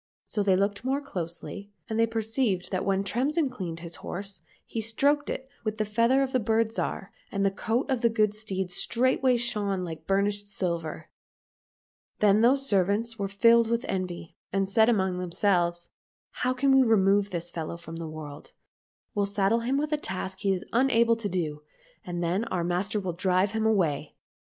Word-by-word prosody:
So 210 - -2
they 195 -2 +3
looked 200 +3 0
more 265 +2 0
closely, 200 - -6 0.2
and 220 0 -2
they 230 - +4
perceived 225 -3 -1
that 185 -1 -1
when 195 0 +1
Tremsin 265 - 0
cleaned 175 -8 -6
his 170 0 -6
horse 195 -1 -6 0.2
he 225 - -4
stroked 280 +7 +1
it 265 - -4 0.2
with 215 -1 -2
the 215 - 0
feather 230 +6 +3
of 265 - -2
the 255 - +2
Bird 225 0 +1
Zhar, 200 -3 -3 0.2
and 200 0 0
the 195 - +3
coat 225 +5 -1
of 260 -4 0
the 235 - +4
good 215 -2 +2
steed 190 -4 -3
straightway 255 +5 +2
shone 205 -5 -1
like 160 -2 -7
burnished 205 +1 0
silver. 170 -5 -3 1.1
Then 210 0 +4
those 270 +4 +4
servants 205 +3 +1
were 200 - -1
filled 230 +3 +4
with 235 +2 -1
envy, 180 -3 -4 0.2
and 195 0 +1
said 220 +4 +4
among 190 -5 +1
themselves, 175 -1 +1 0.2
" - - -84
How 250 - +2
can 270 +2 +2
we 265 - +7
remove 205 -4 +3
this 175 -2 -3
fellow 165 0 -5
from 165 -1 -9
the 165 -1 -5
world? 150 -2 -9 0.6
We'll 205 -3 +1
saddle 200 +3 +2
him 250 +4 0
with 300 +1 -1
a - - +3
task 190 -6 -4
he 195 - +1
is 185 -2 -2
unable 235 -2 +4
to 225 -3 -3
do, 155 -5 -2 0.4
and 175 -1 -4
then 185 +7 0
our 180 -6 -2
master 180 +5 0
will 185 -3 -3
drive 185 +2 +2
him 220 0 0
away." 160 -9 0
200 Hz, 185 wpm, -27 LUFS, 185-230 Hz, 1.1 s, we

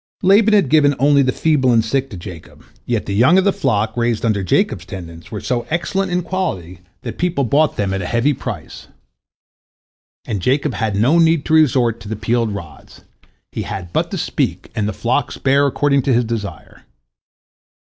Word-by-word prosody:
Laban 210 +3 +5
had 190 -10 +3
given 145 -2 +4
only 140 +2 +4
the 130 -1 +2
feeble 135 -4 +1
and 115 -2 +3
sick 135 +4 -1
to 95 - -8
Jacob, 85 -2 -11 0.2
yet 120 -3 -1
the 100 - -3
young 130 - +4
of 190 - +4
the 200 0 +2
flock, 110 -4 -1
raised 120 -1 0
under 105 -3 +1
Jacob's 100 - 0
tendance, 85 -3 -10
were 105 - -5
so 120 +1 -3
excellent 185 +3 -1
in 180 0 0
quality 95 - -4 0.2
that - - -7
people 170 -5 0
bought 145 +5 +2
them 100 -2 -1
at 95 - -2
a 90 - -4
heavy 120 +8 +1
price. - - -7 1.4
And 100 -4 -3
Jacob 135 - 0
had 105 -1 -2
no 130 +12 +3
need 165 -2 +3
to 160 - -1
resort 125 -7 +3
to 110 - -11
the 110 - -3
peeled 115 +1 -1
rods. 85 -7 -10 0.5
He - - -4
had 90 -3 -6
but - - 0
to - - -4
speak, - - -2
and 105 -1 -1
the - - -1
flocks 125 +4 -1
bare 140 +1 +2
according 140 0 +1
to 130 0 +1
his 120 0 +2
desire. 110 -3 -6
125 Hz, 190 wpm, -18 LUFS, 105-150 Hz, 1.4 s, Laban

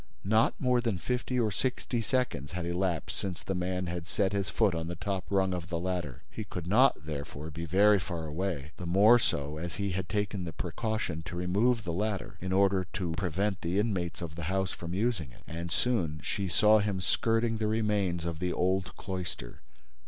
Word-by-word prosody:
Not 110 +3 +3
more 125 -2 +3
than 115 -5 0
fifty 125 +5 -1
or 110 -3 +2
sixty 120 +2 -1
seconds 110 - -1
had 90 -1 -3
elapsed 85 -1 -1
since 95 -3 -4
the 95 - -2
man 90 0 -1
had 85 -1 -4
set 100 -1 +1
his 100 -2 0
foot 105 -5 +3
on 80 -1 -2
the 85 - -3
top 95 +2 -2
rung 95 -1 +2
of 85 -1 -4
the 85 - -1
ladder. 85 -6 -3
He 110 - -5
could 90 -4 -6
not, 110 - +4
therefore, 75 0 -5
be 85 +3 -5
very 100 +4 +5
far 85 -4 -4
away, 80 -2 -3
the 90 - -5
more 105 +7 +7
so 75 -8 -1
as 85 +1 -4
he 100 -1 -1
had 90 0 -3
taken 105 -2 -1
the 85 -2 -5
precaution 90 -1 -2
to 90 - -6
remove 105 +7 +2
the 85 -3 -3
ladder, 100 +1 -2
in 95 +1 -3
order 95 -1 +3
to 90 -4 -2
prevent 95 +3 -1
the 85 +3 -1
inmates 90 -6 0
of 80 -2 -5
the 85 -1 -5
house 95 0 0
from 85 +1 -5
using 100 - 0
it. - - -18
And 85 +1 -5
soon 85 -12 +1
she 100 -1 -2
saw 105 +5 +5
him 100 -2 0
skirting 115 +4 +1
the 110 -1 0
remains 105 -6 +1
of 85 -2 -3
the 90 0 0
old 95 +1 0
cloister. 90 -10 -5
95 Hz, 205 wpm, -30 LUFS, 85-105 Hz, -, more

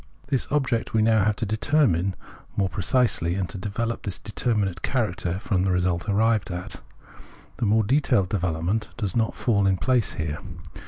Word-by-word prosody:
This 135 -3 0
object 135 -6 0
we 110 - +4
have 110 -2 +4
now - - +4
to 115 - -3
determine 110 - +1 0.4
more 95 -2 +2
pre 95 - -4
cisely, 95 -5 +1
and 95 -2 -1
to - - -7
develop 115 +4 -3
this 100 - -3
determinate 105 -5 -1
character 95 -8 -1
from 95 -2 0
the 95 - +1
result 90 +1 0
arrived 110 +1 +2
at: 90 0 -6 0.8
the 115 - 0
more 110 +2 +4
detailed 125 -5 +2
development 90 +3 -1
does 100 -6 -2
not 115 -1 +1
fall 100 -5 +2
in 95 -1 +2
place 125 +1 +1
here. 80 -1 -3
100 Hz, 170 wpm, -25 LUFS, 90-115 Hz, 0.8 s, we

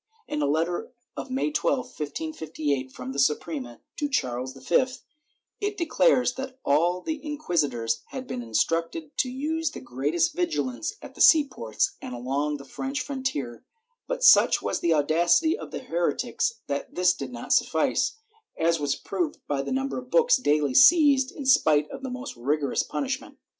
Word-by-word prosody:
In 150 - -2
a 145 - +1
letter 165 - -1 0.2
of - - -6
May 265 +4 -1
12, 275 -4 0
1558, 150 - -4
from 125 0 -7
the 140 - -4
Suprema 135 -3 -1 0.2
to 290 - -1
Charles 130 - -2
V, 150 - +2 0.7
it 410 0 -2
declares 325 - +3
that 265 0 -7
all 170 +5 +2
the 315 - -4
inquisitors 145 - -1
had 260 -1 -7
been 125 - -5
instructed 165 - -1
to 255 - +1
use 315 +5 -2
the - - -9
greatest 145 +7 -1
vigilance 330 0 -2
at - - -10
the - - -7
sea 315 -2 +8
ports 110 - -2
and 125 - -6
along 140 +5 -2
the 140 - -12
French 270 - -4
frontier, 260 - -4 0.4
but - - -3
such - - +7
was - - -2
the 170 - +1
audacity 170 - +3
of - - -8
the - - -6
heretics - - -1
that 140 0 -4
this 180 0 +4
did 135 -2 -7
not 120 -1 -2
suffice, - - +1 0.4
as 165 0 +2
was 145 -2 0
proved 180 -5 -3
by 140 -2 0
the - - -5
number 270 0 -1
of 250 0 -12
books 485 - +5
daily 150 - +1
seized 280 - +6
in 285 - -8
spite 155 - +4
of - - -7
the 265 - -5
most 255 +2 -6
rigorous 140 +4 0
punishment. 275 +1 -4
170 Hz, 170 wpm, -26 LUFS, -, 0.7 s, sea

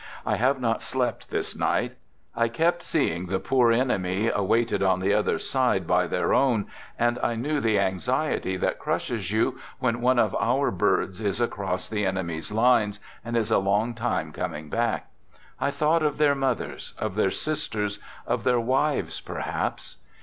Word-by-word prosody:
I - - +1
have 130 +3 +2
not 115 -3 0
slept 130 -2 -2
this - - -3
night. - - 0 0.4
I 115 - +2
kept 165 +9 +1
seeing 90 - -1
the 95 +1 -1
poor 125 -3 +3
enemy 110 -4 +1
awaited 115 +3 +1
on 95 -1 +3
the 95 +2 +1
other 105 0 +2
side - - +1
by - - +2
their - - 0
own, 120 -7 +3 0.3
and 120 +1 +1
I 120 - 0
knew 145 +6 -1
the 110 -4 +2
anxiety 95 0 0
that - - -1
crushes 100 -6 -2
you 110 +1 +1 0.2
when 120 -2 0
one 130 +1 +3
of 110 -4 +2
our 135 +4 +2
"birds" 95 +1 0
is 100 0 -1
across 100 -6 -2
the 105 -1 -2
enemy's 85 -4 -2
lines 110 -2 +3 0.2
and 120 +1 -2
is 110 -1 0
a - - +5
long 105 +4 +1
time 115 -9 -2
coming 75 0 -5
back. - - -1 0.5
I - - +1
thought 150 +3 +2
of 150 -2 0
their 145 -1 +4
moth 135 -3 0
ers, - - -8
of 110 -3 -3
their 100 -1 +2
sisters, 105 -7 -2 0.3
of - - -1
their 125 -1 +3
wives 130 +5 0
perhaps. - - -4
115 Hz, 170 wpm, -26 LUFS, 100-125 Hz, 0.5 s, a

